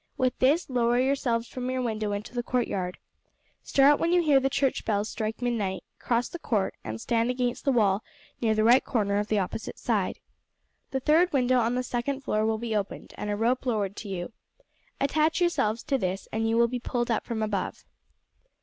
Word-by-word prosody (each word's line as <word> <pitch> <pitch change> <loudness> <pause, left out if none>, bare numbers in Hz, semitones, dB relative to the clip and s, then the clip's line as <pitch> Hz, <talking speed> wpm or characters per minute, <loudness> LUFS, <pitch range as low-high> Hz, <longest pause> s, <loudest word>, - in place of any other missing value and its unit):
With 255 -2 0
this 290 +7 +3
lower 240 -2 +2
yourselves 250 -3 +1
from 255 0 -5
your 255 0 -1
window 215 -3 -2
into 205 +3 -5
the 245 - -1
courtyard. 200 -8 -2 0.6
Start 280 +1 +4
when 335 - +1
you 355 -1 +4
hear 290 -4 +5
the 270 0 +1
church 270 -1 0
bells 210 -1 0
strike 220 +2 -4
midnight, 205 -7 -1 0.2
cross 240 0 0
the 345 - -8
court 210 -10 0
and 110 0 -5
stand 230 - +1
against 250 -1 -1
the 275 - +4
wall 210 -4 +2 0.4
near 220 -2 +2
the 215 - +2
right 240 +4 +6
hand - - -37
corner 205 -3 +1
of 210 - -2
the 215 - +1
opposite 200 +3 -3
side. - - -1 0.7
The 265 - -2
third 330 +6 +4
window 255 -2 +3
on 235 +1 +1
the 250 - 0
second 255 +3 -2
floor 215 -5 0
will 220 0 +1
be 225 -1 -3
opened, 205 -1 -4
and 210 - -5
a 205 - 0
rope 235 +4 +1
lowered 205 -4 0
to 210 - -7
you. 185 +3 -5 0.7
Attach 310 +4 +2
yourselves 235 -11 +1
to 275 -3 0
this, 185 0 -2
and 225 +1 0
you 225 - +2
will 235 0 +5
be 245 +1 -3
pulled 240 0 -2
up 225 - 0
from 220 -2 -3
above." 205 -3 -3
235 Hz, 205 wpm, -27 LUFS, 215-255 Hz, 0.7 s, right